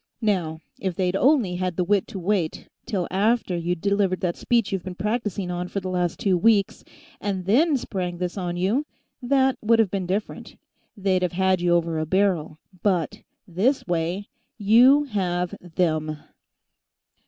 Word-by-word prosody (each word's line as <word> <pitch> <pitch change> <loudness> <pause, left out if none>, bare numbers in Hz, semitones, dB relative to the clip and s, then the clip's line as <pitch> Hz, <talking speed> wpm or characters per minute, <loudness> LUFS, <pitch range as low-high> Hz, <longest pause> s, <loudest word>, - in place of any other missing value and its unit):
Now, 170 -7 0 0.2
if 190 -3 -2
they'd 185 0 0
only 240 -7 +3
had 185 -1 -2
the 180 - +2
wit 200 +2 +1
to 220 - -7
wait 180 -3 -1 0.2
till 190 -7 -1
after 205 0 +1
you'd 170 0 -2
delivered 200 -2 +1
that 175 -2 -1
speech 235 -5 +1
you've 195 -2 -1
been 185 -1 -6
practicing 205 -2 -2
on 180 0 -3
for 200 - -3
the 185 -1 -5
last 180 -2 -1
two 185 -3 +2
weeks, 205 -1 +2 0.4
and 195 -3 -3
then 280 - +3
spring 180 -7 -4
this 180 0 -3
on 175 -3 -3
you, 220 +12 0 0.3
that 265 0 +2
would 230 +1 +4
have 220 -5 +2
been 190 -3 -2
different. 200 +4 -4 0.4
They'd 190 -2 +1
have 180 -2 -1
had 190 0 +2
you 175 -1 +3
over 165 -2 0
a 155 - -2
barrel. 180 -4 +1 0.2
But 180 -6 0 0.3
this 205 +10 +1
way, 175 +3 -2 0.3
you 240 +7 +6
have 180 -8 -2
them!" 155 -3 -1
190 Hz, 165 wpm, -24 LUFS, 175-210 Hz, 0.4 s, you